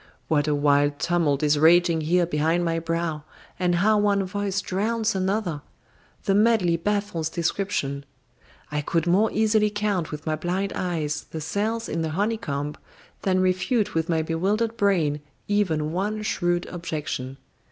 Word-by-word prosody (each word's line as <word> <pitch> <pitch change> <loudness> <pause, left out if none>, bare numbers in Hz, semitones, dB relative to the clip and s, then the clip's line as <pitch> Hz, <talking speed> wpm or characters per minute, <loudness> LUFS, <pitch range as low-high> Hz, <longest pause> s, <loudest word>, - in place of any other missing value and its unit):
What 150 -1 +1
a 150 - +2
wild 145 0 +2
tumult 155 -5 +1
is 150 0 +3
raging 170 +1 +5
here 175 +3 +2
behind 165 +2 +1
my 165 0 0
brow, 165 -2 -2 0.4
and 180 -1 +2
how 210 +4 +3
one 200 -1 +2
voice 200 +1 -2
drowns 215 +4 -1
another! 190 -4 -1 0.6
The 195 - +1
medley 205 -5 +3
baffles 200 -2 -1
description. 165 -5 -2 0.7
I 150 0 -1
could 165 +2 0
more 190 +6 +3
easily 215 -1 +2
count 205 -5 -1
with 150 0 -7
my 155 -1 0
blind 180 +5 -2
eyes 160 -4 -2
the 160 - -5
cells 220 +8 -2
in 165 +1 -2
a 160 - -1
honeycomb 155 -6 -2 0.4
than 185 -1 +2
refute 200 +4 +1
with 165 0 -1
my 160 -1 +1
bewildered 200 +8 0
brain 170 -9 +1 0.3
even 165 -7 +1
one 210 +5 -2
shrewd 175 -4 0
objection. 150 -6 -5
175 Hz, 150 wpm, -25 LUFS, 155-205 Hz, 0.7 s, raging